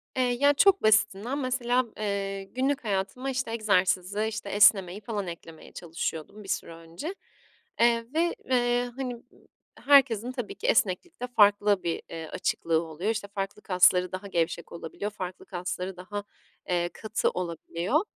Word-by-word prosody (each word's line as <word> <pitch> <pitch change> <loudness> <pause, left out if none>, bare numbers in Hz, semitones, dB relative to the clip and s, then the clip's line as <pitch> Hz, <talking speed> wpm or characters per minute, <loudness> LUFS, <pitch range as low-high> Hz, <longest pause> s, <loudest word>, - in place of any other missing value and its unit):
Eee, 255 - +2 0.2
ya 285 0 +5
çok 390 +6 +4
basitinden 215 +4 +3
mesela, 250 -1 +1
eee, 200 -2 -2
günlük 265 +7 -1
hayatıma 210 +6 -2
işte 260 -3 -2
egzersizi, 200 -2 +1
işte 215 -2 -5
esnemeyi 200 -2 +4
falan 205 -3 -4
eklemeye 165 -2 -10
çalışıyordum 165 +3 -5
bir - - -12
süre 170 -3 -2
önce. 165 - -7 0.6
Eee, 235 0 +4
ve, 340 +2 +1
eee, 245 -1 +2
hani, 260 -2 -3
ııı, 235 - -17 0.4
herkesin 250 -4 +5
tabii 245 -5 -5
ki - - -4
esneklikte 245 - +1
farklı 205 -4 +4
bir, 170 -1 -2
eee, 160 -1 -6
açıklığı 165 0 0
oluyor. 165 +6 -4
İşte 215 -2 -4
farklı 200 +1 -5
kasları 180 -1 +4
daha 185 +2 -5
gevşek 170 -2 -1
olabiliyor, 170 +5 -5
farklı 185 -3 -7
kasları 180 +1 -4
daha, 205 +3 -5 0.5
eee, 175 -1 +1
katı 220 -1 -1
olabiliyor. 175 - -1
205 Hz, 145 wpm, -27 LUFS, 180-245 Hz, 0.6 s, ya